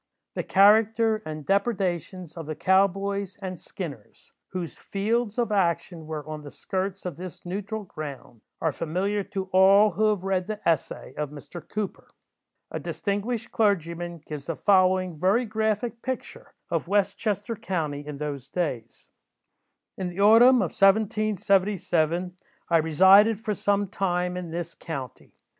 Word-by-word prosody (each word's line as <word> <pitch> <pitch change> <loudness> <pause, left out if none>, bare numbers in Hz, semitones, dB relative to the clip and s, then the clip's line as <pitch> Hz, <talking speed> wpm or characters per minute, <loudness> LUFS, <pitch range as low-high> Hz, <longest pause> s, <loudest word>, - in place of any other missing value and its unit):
The - - -2
character 220 +2 +4
and 155 -1 -6
depredations 185 - -1
of 165 -3 -7
the 155 - -4
"cow 190 +4 +4
boys" 200 0 -4
and 185 -3 -6
"skinners," 145 - -9
whose 180 -3 -5
fields 215 +2 -1
of 235 -3 0
action 170 -4 0
were 155 -2 -5
on 155 -1 -6
the 145 - -9
skirts 190 +5 -4
of 175 -5 -4
this 180 0 -9
neutral 205 +4 -4
ground, 140 - -8 0.2
are 160 - +1
familiar 185 +7 -1
to 195 -1 -4
all 195 +3 +6
who 215 +4 +1
have 205 -4 -1
read 190 -2 0
"the 215 -1 -4
Essay" 160 -4 -1
of 150 -1 -2
Mr. 150 +4 -9
Cooper. 210 -2 -4 0.6
A - - -3
distinguished 205 +3 -3
clergyman 175 -5 0
gives 150 -2 -7
the 165 - -2
following 185 -1 +3
very 190 +10 +2
graphic 220 +1 -1
picture 260 -1 -6 0.2
of - - -1
West 200 0 +1
Chester 210 +2 -2
county 155 -8 -3
in 150 -1 -6
those 145 -3 -5
days:— 130 -10 -4 0.9
"In 185 - -2
the 175 +2 -8
autumn 230 +3 +7
of 170 - -3
1777, 195 -4 +2 0.3
I 170 - +5
resided 190 +7 +6
for 220 -1 -2
some 205 0 0
time 180 -2 -1
in 180 -2 -5
this 170 0 -4
county. 135 -7 -8
190 Hz, 150 wpm, -26 LUFS, 165-205 Hz, 0.9 s, autumn